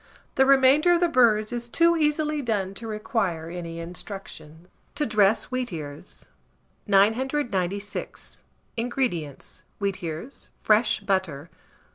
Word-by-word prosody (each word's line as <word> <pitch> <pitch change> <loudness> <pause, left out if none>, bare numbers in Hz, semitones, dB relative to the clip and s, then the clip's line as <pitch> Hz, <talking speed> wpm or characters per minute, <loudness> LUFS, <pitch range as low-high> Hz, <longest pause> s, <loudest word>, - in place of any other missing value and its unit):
The 265 0 +3
remainder 275 +5 +5
of 345 - +3
the 350 - +3
birds 230 -7 +3
is 240 0 -3
too 335 +5 +4
easily 300 -1 +1
done 205 -6 -1
to 225 +3 -8
require 200 -6 -2
any 170 -1 -6
instructions. 170 -2 -8 0.3
TO 295 +1 0
DRESS 215 0 +2
WHEATEARS. 170 - -6 0.6
996. 205 -2 0 0.4
INGREDIENTS. 230 - -3 0.2
Wheatears; 195 - -5
fresh 215 +1 +3
butter. 170 -6 -2
215 Hz, 105 wpm, -25 LUFS, 180-260 Hz, 0.6 s, remainder